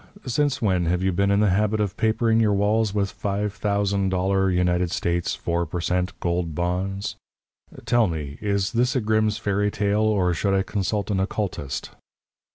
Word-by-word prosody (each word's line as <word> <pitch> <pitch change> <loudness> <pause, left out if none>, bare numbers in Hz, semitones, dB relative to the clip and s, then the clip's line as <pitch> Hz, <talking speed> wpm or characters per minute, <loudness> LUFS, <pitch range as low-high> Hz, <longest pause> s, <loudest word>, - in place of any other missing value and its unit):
since 140 +3 0
when 90 -5 +1
have 90 +2 0
you 95 - +2
been 100 +2 +1
in 100 +1 +3
the 105 -3 +3
habit 105 +3 +1
of 105 -3 -1
papering 110 0 +2
your 105 -3 +3
walls 105 +1 +2
with 100 -1 -1
five 100 0 -2
thousand 100 -2 0
dollar 95 +1 +1
United 90 -1 +1
States 85 0 -1
four 85 0 -1
per 85 +2 -4
cent. 90 +1 -1
gold 85 -2 -1
bonds? 95 +3 -2 0.7
Tell 115 -1 +3
me 75 -4 -5
is 100 -2 0
this 125 +4 +1
a - - +3
Grimm's 110 -1 +1
fairy 100 0 0
tale, 105 +1 0
or 100 -5 +2
should 95 +3 0
I 95 - +2
consult 105 +1 -2
an 95 - +1
oculist?" 90 -9 -3
100 Hz, 175 wpm, -24 LUFS, 90-105 Hz, 0.7 s, in